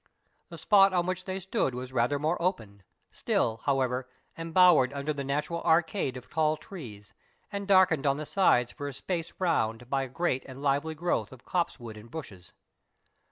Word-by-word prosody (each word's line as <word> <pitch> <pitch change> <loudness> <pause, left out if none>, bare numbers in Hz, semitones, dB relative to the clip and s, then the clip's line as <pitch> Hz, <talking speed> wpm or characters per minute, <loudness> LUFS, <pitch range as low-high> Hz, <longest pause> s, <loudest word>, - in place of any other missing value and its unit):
The - - -9
spot 195 -2 +5
on 175 -1 +2
which 185 0 -3
they 190 0 -3
stood 190 - -1
was 130 +1 -6
rather 125 +3 +1
more 155 +5 -1
open; 110 - -2 0.3
still, 110 -1 0
however, 130 -2 0 0.3
embowered 165 -5 +4
under 140 +2 -2
the 140 -1 -4
natural 150 +5 -2
arcade 160 -4 +1
of 125 - -11
tall 155 -1 +1
trees, 115 - -10 0.4
and 200 -1 -4
darkened 180 -7 +4
on 140 0 +2
the 155 - -5
sides 125 -10 +3
for 145 -1 -6
a 140 - -5
space 165 +5 -4
around 120 -9 0
by 135 -1 +1
a 135 - -4
great 135 -2 -1
and 130 0 -10
lively 145 +3 0
growth 155 -10 -1
of 130 -2 -14
copse 175 -5 -1
wood 115 -3 -9
and 110 +2 -13
bushes. 100 - -9
145 Hz, 180 wpm, -28 LUFS, 125-175 Hz, 0.4 s, spot